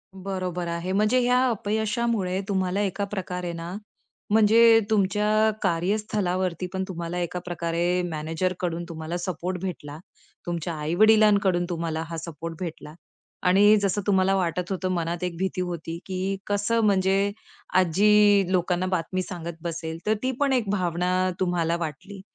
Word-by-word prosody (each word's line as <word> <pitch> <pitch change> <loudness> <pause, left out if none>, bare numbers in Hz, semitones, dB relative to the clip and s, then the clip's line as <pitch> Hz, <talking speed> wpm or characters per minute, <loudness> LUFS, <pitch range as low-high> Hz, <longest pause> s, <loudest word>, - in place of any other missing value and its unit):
बरोबर 185 -2 -4
आहे, 170 +2 -3
म्हणजे 215 +6 +3
ह्या 250 +1 +3
अपयशामुळे 215 -2 -1
तुम्हाला 190 0 0
एका 200 0 -1
प्रकारे 180 -3 -4
ना 170 +1 -6 0.6
म्हणजे 225 +2 +6
तुमच्या 210 0 +2 0.3
कार्यस्थलावरती 185 -1 -1
पण 190 0 -1
तुम्हाला 170 -1 -5
एका 175 +1 -3
प्रकारे 175 +1 -1
मॅनेजरकडून 170 +2 -2
तुम्हाला 160 +1 -4
सपोर्ट 180 +1 -3
भेटला, 155 -6 -5 0.5
तुमच्या 170 -1 -3
आई-वडिलांकडून 200 +2 +4
तुम्हाला 165 -2 -2
हा 165 +1 -5
सपोर्ट 165 0 -6
भेटला 165 -4 -6 0.5
आणि 205 +3 +6
जसं 200 +1 0
तुम्हाला 195 -1 +3
वाटत 180 0 -1
होतं, 185 -1 -2
मनात 170 0 -2
एक 180 -1 -2
भीती 190 0 -2
होती 170 -2 -4
की 190 +1 -2
कसं 205 +3 +1
म्हणजे 195 0 +2 0.5
आजी 205 +3 +4
लोकांना 180 0 +1
बातमी 185 0 -1
सांगत 170 -2 -6
बसेल, 165 -1 -4
तर 215 - +3
ती 260 - +1
पण 280 -2 +2
एक 240 -6 0
भावना 185 -1 0
तुम्हाला 175 -2 +1
वाटली. 180 +5 -6
185 Hz, 135 wpm, -25 LUFS, 170-200 Hz, 0.6 s, म्हणजे